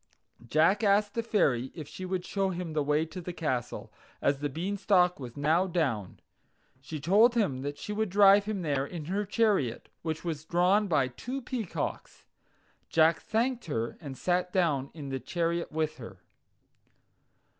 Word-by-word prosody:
Jack 165 Hz, -, +3 dB
asked 205 Hz, 0 st, +3 dB
the 230 Hz, -, 0 dB
Fairy 140 Hz, -, +1 dB
if 155 Hz, -5 st, -7 dB
she 185 Hz, -, -7 dB
would 185 Hz, -1 st, -3 dB
show 195 Hz, -1 st, 0 dB
him 175 Hz, -3 st, -4 dB
the 155 Hz, -, +1 dB
way 150 Hz, +2 st, +1 dB
to 180 Hz, +3 st, -8 dB
the 180 Hz, -, -5 dB
castle, 130 Hz, -8 st, -3 dB, 0.3 s
as 140 Hz, -1 st, +1 dB
the 145 Hz, 0 st, -2 dB
Beanstalk 180 Hz, +2 st, +1 dB
was 125 Hz, -2 st, -8 dB
now 160 Hz, +6 st, +2 dB
down. 135 Hz, -, -1 dB, 0.6 s
She 150 Hz, +3 st, -7 dB
told 210 Hz, -, +4 dB
him 145 Hz, -, +1 dB
that 145 Hz, +1 st, -4 dB
she 210 Hz, -, -5 dB
would 215 Hz, -1 st, -1 dB
drive 200 Hz, +1 st, +6 dB
him 205 Hz, -4 st, -3 dB
there 140 Hz, -4 st, 0 dB
in 155 Hz, +1 st, -6 dB
her 200 Hz, +5 st, -1 dB
chariot, 205 Hz, -, +1 dB
which 160 Hz, -1 st, -3 dB
was 155 Hz, -3 st, -3 dB
drawn 180 Hz, +5 st, +2 dB
by 140 Hz, -7 st, +2 dB
two 245 Hz, -, -5 dB
peacocks. 240 Hz, -6 st, -5 dB, 0.6 s
Jack 160 Hz, 0 st, +4 dB
thanked 235 Hz, +2 st, -1 dB
her, 115 Hz, -8 st, -2 dB
and 135 Hz, -3 st, -7 dB
sat 180 Hz, 0 st, 0 dB
down 150 Hz, -8 st, +1 dB
in 145 Hz, -4 st, -7 dB
the 135 Hz, 0 st, -3 dB
chariot 170 Hz, +3 st, -2 dB
with 155 Hz, 0 st, -1 dB
her. 115 Hz, -6 st, -10 dB
170 Hz, 165 wpm, -29 LUFS, 145-200 Hz, 0.6 s, drive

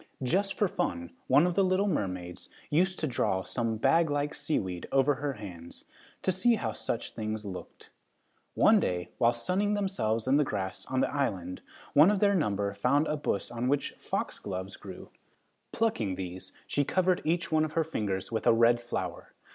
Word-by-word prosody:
Just 195 Hz, +9 st, +1 dB
for 205 Hz, -, +2 dB
fun, 85 Hz, -, -3 dB, 0.2 s
one 140 Hz, +6 st, +5 dB
of 180 Hz, -, +1 dB
the 195 Hz, -, +3 dB
little 185 Hz, +2 st, +2 dB
mermaids 90 Hz, -, -3 dB, 0.2 s
used 185 Hz, +5 st, +2 dB
to -, -, -1 dB
draw 95 Hz, -8 st, 0 dB
some 115 Hz, 0 st, -2 dB
bag 155 Hz, +7 st, +3 dB
like 145 Hz, 0 st, -1 dB
seaweed 95 Hz, -, -2 dB
over 135 Hz, +1 st, +4 dB
her 145 Hz, +1 st, -3 dB
hands, 90 Hz, -7 st, -10 dB, 0.4 s
to 190 Hz, -, +2 dB
see 200 Hz, +6 st, +3 dB
how -, -, -2 dB
such 115 Hz, -, -3 dB
things 110 Hz, -1 st, -4 dB
looked. 95 Hz, -2 st, -9 dB, 0.6 s
One -, -, +6 dB
day, 90 Hz, -1 st, -2 dB
while 120 Hz, 0 st, +4 dB
sunning 190 Hz, -, 0 dB
themselves 120 Hz, -, -1 dB
in 135 Hz, +2 st, +4 dB
the 150 Hz, -, +4 dB
grass 100 Hz, -7 st, -4 dB
on 130 Hz, 0 st, 0 dB
the -, -, 0 dB
island, 95 Hz, -11 st, -2 dB, 0.3 s
one 150 Hz, +5 st, +7 dB
of 210 Hz, -, +2 dB
their 200 Hz, +1 st, +3 dB
number 100 Hz, -, 0 dB
found 140 Hz, +9 st, +2 dB
a 155 Hz, -, -1 dB
bush 145 Hz, -9 st, -2 dB
on 120 Hz, +1 st, -2 dB
which 140 Hz, +1 st, +1 dB
foxgloves 95 Hz, 0 st, -4 dB
grew. -, -, -10 dB, 0.6 s
Plucking 115 Hz, -, 0 dB
these, 90 Hz, 0 st, -6 dB
she 145 Hz, -, 0 dB
covered 185 Hz, +4 st, +1 dB
each 170 Hz, +2 st, 0 dB
one 155 Hz, 0 st, +3 dB
of 155 Hz, -1 st, -3 dB
her 165 Hz, -, +2 dB
fingers 105 Hz, -12 st, -3 dB
with 110 Hz, -, -1 dB
a -, -, +7 dB
red 120 Hz, +1 st, +4 dB
flower. 120 Hz, -, -5 dB
130 Hz, 180 wpm, -29 LUFS, 100-165 Hz, 0.6 s, one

